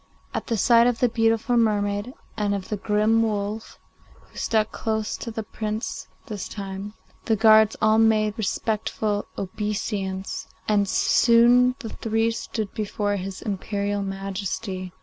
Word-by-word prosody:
At - - -3
the 230 - 0
sight 235 +3 +5
of 245 -2 +1
the 245 - +2
beautiful 225 +2 +2
mermaid 205 +1 0 0.2
and 205 -2 0
of 195 -2 -6
the 210 - -1
grim 215 +2 +2
wolf, 215 0 -2 0.4
who - - -25
stuck 220 -1 0
close 220 -1 -2
to - - -6
the 220 -1 -4
Prince 215 +1 -4 0.2
this 210 -3 -6
time, 195 +1 -6 0.3
the 225 - +2
guards 220 0 +6
all 215 0 +5
made 215 -1 +3
respectful 215 -1 -1
obeisance, 200 -1 -3 0.2
and 205 -2 +2
soon 240 +4 +5
the 225 - -6
three 225 +1 0
stood 220 -2 -4
before 205 -1 -1
his 190 0 -6
Imperial 205 0 -2
Majesty. 195 -1 -4
215 Hz, 140 wpm, -24 LUFS, 200-225 Hz, 0.4 s, guards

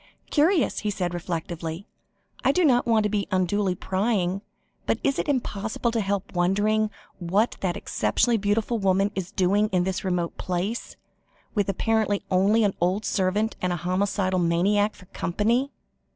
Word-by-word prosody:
"Curious," 320 - +3
he 210 - -2
said 180 -3 -2
reflectively. 170 0 -4 0.6
"I 265 - +4
do 360 +4 +2
not 245 -4 +3
want 225 -2 +3
to 210 - +1
be 205 -1 -1
unduly 185 0 +1
prying, 190 -1 0 0.5
but - - +2
it - - +2
is 275 - -2
impossible 230 -4 -1
to 230 -1 0
help 200 -1 -2
wondering 205 +5 +2 0.3
what 195 +6 +1
that 180 -3 -1
exceptionally 115 - +1
beautiful 215 +3 0
woman 195 +1 +2
is 190 -3 -4
doing 205 +2 +2
in 180 -2 +1
this 190 0 -2
remote 180 -3 -2
place, 185 +6 -3 0.6
with 205 -3 0
apparently 210 0 +1
only 200 +5 +4
an 200 -2 +2
old 185 +4 +1
servant 205 +3 0
and 180 - 0
a - - 0
homicidal 185 +2 0
maniac 195 +5 +2
for 185 - -15
company." 225 +10 0
200 Hz, 155 wpm, -25 LUFS, 180-215 Hz, 0.6 s, I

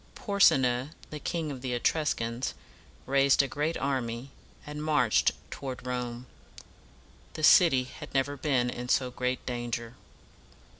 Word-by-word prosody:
Por´se 200 -8 +4
na, 125 0 0 0.2
the 150 - -5
King 160 -1 -3
of 130 -3 -7
the 130 -1 -3
E 120 - -1
trus 155 +4 +1
cans, 115 +2 -3 0.5
raised 140 0 +4
a - - -2
great 150 +4 -2
army, 130 -1 -2 0.3
and 150 0 -6
marched 145 -8 +3 0.2
toward 130 -2 -6
Rome. 125 -1 -4 1.1
The 155 - -5
city 150 -5 +6
had 130 - -10
never 140 +1 0
been 130 -4 0
in 125 0 -6
so 125 -1 +2
great 125 +1 -2
danger. 120 -1 -4
130 Hz, 145 wpm, -29 LUFS, 125-145 Hz, 1.1 s, city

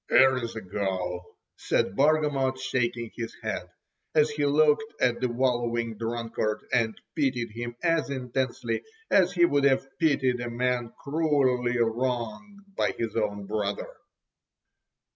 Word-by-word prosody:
""Ere's 130 -3 +4
a 115 - -4
go!" 95 -2 -3 0.2
said 95 - 0
Bargamot 145 -3 +2
shaking 120 -3 -1
his 115 -1 -5
head, - - -3 0.5
as 150 0 +4
he 145 -1 0
looked 155 +9 +2
at 120 -1 +2
the 125 - +1
wallowing 120 -2 0
drunkard, 115 -1 -2
and 115 -3 +1 0.2
pitied 130 -7 0
him 120 +2 -5
as 165 -4 +2
intensely 125 -3 -2 0.3
as 185 -2 +4
he 175 -1 +5
would 145 -4 +2
have 135 -1 +3
pitied 135 -6 +2
a 120 - -3
man 120 0 -1
cruelly 140 -5 +1
wronged 120 - -2
by - - +1
his 115 -2 -3
own 105 -2 -1
brother. 105 0 -3
125 Hz, 130 wpm, -27 LUFS, 115-140 Hz, 0.5 s, he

